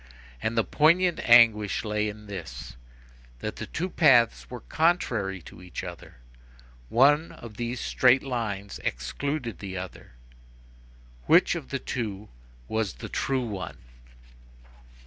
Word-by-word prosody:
And, 115 +1 -2
the 115 - +4
poignant 170 +6 +3
anguish 115 -3 +5
lay 105 0 0
in 105 0 -10
this, 85 -15 -8 0.6
that - - -5
the - - -6
two 180 - -3
paths 130 -10 +4
were 125 -2 -7
contrary 115 - 0
to - - -13
each 90 0 -7
other. 90 -2 -9 0.7
One 145 +6 +4
of 110 -3 -11
these 120 +1 -3
straight 125 +2 +3
lines 110 -7 -4
excluded 115 - -3
the 95 -2 -6
other. 90 -8 -8 1.1
Which - - +5
of 65 - -6
the - - -1
two 105 -4 -5 0.4
was 110 +1 -1
the - - -8
true 130 -2 -1
one? 95 -6 -6
110 Hz, 125 wpm, -27 LUFS, 100-130 Hz, 1.1 s, anguish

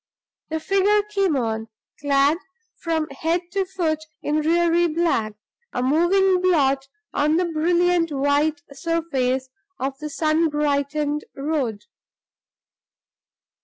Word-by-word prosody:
The 320 0 -2
figure 395 +4 +2
came 395 -6 0
on, 225 -2 -2 0.3
clad 285 +2 +2 0.4
from 320 -2 -1
head 325 +5 -1
to 385 +1 0
foot 345 -5 -1 0.2
in 300 +1 +1
dreary 340 +2 +3
black 310 -10 0 0.4
a 250 - -1
moving 360 +6 +3
blot 275 -7 +2 0.3
on 300 +2 +2
the 360 +2 +2
brilliant 340 +1 +2
white 290 +4 +1
surface 275 -5 -1 0.3
of 270 +1 -3
the 300 0 -5
sun 315 +1 +1
brightened 295 0 -1
road. 275 -7 -2
310 Hz, 110 wpm, -23 LUFS, 280-345 Hz, 0.4 s, dreary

